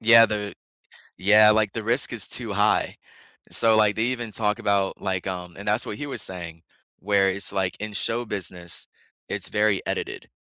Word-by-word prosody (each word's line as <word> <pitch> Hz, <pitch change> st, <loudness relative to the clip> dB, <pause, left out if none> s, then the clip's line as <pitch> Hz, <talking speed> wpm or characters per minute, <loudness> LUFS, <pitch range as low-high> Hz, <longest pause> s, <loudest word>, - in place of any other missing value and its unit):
yeah, 115 Hz, 0 st, +8 dB
the 105 Hz, -1 st, -4 dB, 0.7 s
yeah, 105 Hz, +2 st, +6 dB
like, 105 Hz, -1 st, +3 dB
the 115 Hz, -, -3 dB
risk 120 Hz, +4 st, +1 dB
is 110 Hz, -5 st, 0 dB
too 115 Hz, -5 st, -1 dB
high. 105 Hz, +2 st, +1 dB, 0.5 s
So, 115 Hz, -1 st, +3 dB
like, 105 Hz, -1 st, +3 dB
they 110 Hz, -, +1 dB
even 120 Hz, -2 st, -2 dB
talk 105 Hz, 0 st, -1 dB
about, 100 Hz, -2 st, 0 dB
like, 95 Hz, -2 st, -2 dB
um 90 Hz, -2 st, -5 dB
and 100 Hz, -, -5 dB
that's 105 Hz, +3 st, +1 dB
what 105 Hz, -, -5 dB
he 145 Hz, -, -4 dB
was 120 Hz, -6 st, -4 dB
saying, 85 Hz, -3 st, -5 dB, 0.4 s
where 100 Hz, -1 st, +2 dB
it's, 100 Hz, +1 st, -1 dB
like, 95 Hz, -2 st, -1 dB
in 105 Hz, 0 st, -4 dB
show 115 Hz, +4 st, +1 dB
business, 90 Hz, -4 st, -5 dB, 0.4 s
it's -, -, -2 dB
very 105 Hz, -2 st, +2 dB
edited. -, -, -4 dB
105 Hz, 185 wpm, -24 LUFS, 95-110 Hz, 0.7 s, yeah